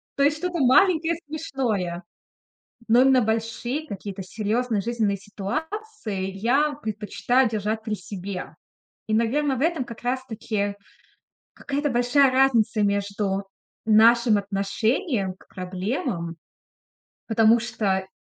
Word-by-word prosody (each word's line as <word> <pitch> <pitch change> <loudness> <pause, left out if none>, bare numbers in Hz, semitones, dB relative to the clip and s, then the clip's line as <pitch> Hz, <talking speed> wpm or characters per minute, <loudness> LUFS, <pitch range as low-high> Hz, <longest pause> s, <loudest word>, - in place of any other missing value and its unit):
То 280 - +2
есть 295 +1 +3
что-то 355 0 -3
маленькое, 325 +4 +4
смешное, 235 - -2 0.8
но 235 +3 +6
именно 265 -1 +5
большие 230 +6 -2
какие-то 195 -2 -6
серьезные 215 +2 -1
жизненные 220 -3 0
ситуации 220 - -5
я 265 +10 +1
предпочитаю 230 +1 0
держать 215 0 -2
при 220 -1 -3
себе. 190 -1 -7 0.5
И, 215 - -1
наверно, 265 +5 +1
в 260 - -4
этом 325 -5 +1
как 230 -2 -10
раз 255 +1 -2
таки 210 -3 -3 0.8
какая-то 285 +1 -2
большая 250 +3 +4
разница 235 -5 +3
между 200 -1 0 0.4
нашим 225 +1 +5
отношением 200 - -1
к - - -22
проблемам. 185 - -4 0.9
Потому 225 0 +5
что, 195 -5 -1
225 Hz, 110 wpm, -24 LUFS, 200-265 Hz, 0.9 s, но